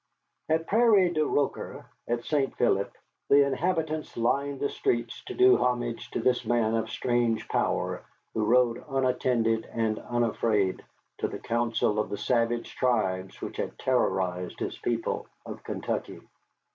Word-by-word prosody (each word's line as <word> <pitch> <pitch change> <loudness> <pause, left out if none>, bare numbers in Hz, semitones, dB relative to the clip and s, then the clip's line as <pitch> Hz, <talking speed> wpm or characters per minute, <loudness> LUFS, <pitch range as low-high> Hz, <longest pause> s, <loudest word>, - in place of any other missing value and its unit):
At 160 +1 +2
Prairie 210 -4 +4
du 155 -2 +1
Rocher, 145 -1 -2 0.2
at 120 0 -1
St. 140 -3 0
Philippe, 100 -4 +1 0.3
the 140 0 +7
inhabitants 155 +1 -1
lined 140 +4 0
the 140 - 0
streets 120 -1 -1
to 380 - -6
do 380 +1 +6
homage 120 -2 -1
to - - -3
this 125 +2 +2
man 115 -2 +1
of 115 0 0
strange 120 -2 0
power - - -1 0.3
who 110 - 0
rode, 120 +1 +3
unattended 125 -4 +1
and 110 -2 0
unafraid, 110 -5 0 0.4
to - - 0
the - - -6
council 115 -2 0
of 105 - -1
the 105 - -3
savage 120 0 0
tribes 95 -7 0
which - - -6
had - - -4
terrorized 90 -1 0
his - - -3
people - - -2 0.2
of - - -8
Kentucky. - - -4
120 Hz, 145 wpm, -28 LUFS, 115-140 Hz, 0.4 s, the